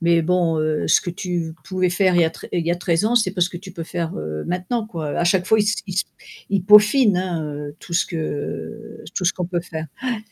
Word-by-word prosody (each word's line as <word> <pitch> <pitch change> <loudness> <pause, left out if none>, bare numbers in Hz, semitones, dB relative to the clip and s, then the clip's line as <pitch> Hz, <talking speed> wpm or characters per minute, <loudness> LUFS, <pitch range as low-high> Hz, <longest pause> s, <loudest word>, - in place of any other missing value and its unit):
mais 170 -1 +4
bon, 170 -1 +1
heu, 155 -1 0
ce - - +5
que 175 - -4
tu 170 -2 -3
pouvais 185 -1 0
faire 185 -1 +3
il 170 - +5
y 160 - -3
tr - - -10
heu, - - -16
il 170 -2 -1
y 170 - +2
a - - +2
13 175 +1 0
ans, 235 +2 +2
c'est 220 -6 +3
pas 185 -1 -5
ce 175 - +3
que 175 - -7
tu 190 +1 -9
peux 165 -1 -6
faire, 170 0 -3
heu, 75 0 -4
maintenant 185 +6 -1
quoi. 160 -8 -5
Heu, - - -3
à - - +1
chaque 180 +1 +2
fois, 220 0 +4
ils - - +4
s 210 +1 +1
ils 185 - -5
s 180 - +2 0.5
ils 195 -3 +1
peaufinent 210 +1 +6
hein, 175 -4 -2
heu, 145 +1 -7
tout 170 - -11
ce 170 - +3
que 165 +7 -5
tout 185 - -2
ce 185 - +3
qu'on 180 - -3
peut 175 -1 -1
faire. 160 -2 -6 0.2
Ouais. 250 -3 -1
180 Hz, 280 wpm, -21 LUFS, 165-195 Hz, 0.5 s, peaufinent